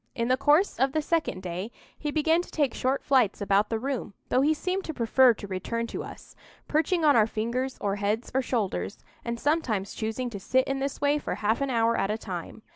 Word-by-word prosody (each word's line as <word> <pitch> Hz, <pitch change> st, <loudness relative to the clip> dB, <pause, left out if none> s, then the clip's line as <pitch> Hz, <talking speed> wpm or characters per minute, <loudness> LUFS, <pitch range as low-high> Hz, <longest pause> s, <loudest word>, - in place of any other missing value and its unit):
In 235 Hz, -1 st, -1 dB
the 255 Hz, -, +5 dB
course 295 Hz, +7 st, +3 dB
of 265 Hz, +1 st, +2 dB
the 310 Hz, -, +1 dB
second 315 Hz, -, -1 dB
day 180 Hz, +4 st, -4 dB, 0.3 s
he 300 Hz, -, -4 dB
began 320 Hz, +3 st, +2 dB
to -, -, -11 dB
take 290 Hz, -4 st, 0 dB
short 265 Hz, +2 st, -1 dB
flights 255 Hz, -7 st, +3 dB
about 200 Hz, +1 st, +2 dB
the 225 Hz, -, 0 dB
room, 245 Hz, -4 st, -4 dB
though 255 Hz, -, +3 dB
he 295 Hz, +3 st, +4 dB
seemed 370 Hz, +5 st, -2 dB
to 315 Hz, -, -5 dB
prefer 240 Hz, +1 st, +4 dB
to 205 Hz, -, -8 dB
return 205 Hz, +5 st, -3 dB
to -, -, -5 dB
us; -, -, -11 dB, 0.3 s
perching 320 Hz, +2 st, +1 dB
on 290 Hz, -, +6 dB
our 220 Hz, -2 st, +5 dB
fingers 240 Hz, +4 st, -2 dB
or 200 Hz, 0 st, -1 dB
heads 210 Hz, +3 st, -1 dB
or 265 Hz, -, +2 dB
shoulders, 220 Hz, -5 st, -2 dB, 0.3 s
and 235 Hz, 0 st, -3 dB
sometimes 240 Hz, -11 st, 0 dB
choosing 230 Hz, +3 st, -3 dB
to 200 Hz, -, -6 dB
sit 260 Hz, +7 st, +1 dB
in 270 Hz, 0 st, -1 dB
this 275 Hz, 0 st, -3 dB
way 290 Hz, +1 st, +3 dB
for -, -, -3 dB
half 220 Hz, +5 st, 0 dB
an 275 Hz, -, 0 dB
hour 230 Hz, -2 st, +2 dB
at 195 Hz, -, 0 dB
a 215 Hz, -, 0 dB
time. 190 Hz, 0 st, -7 dB
245 Hz, 225 wpm, -27 LUFS, 215-285 Hz, 0.3 s, on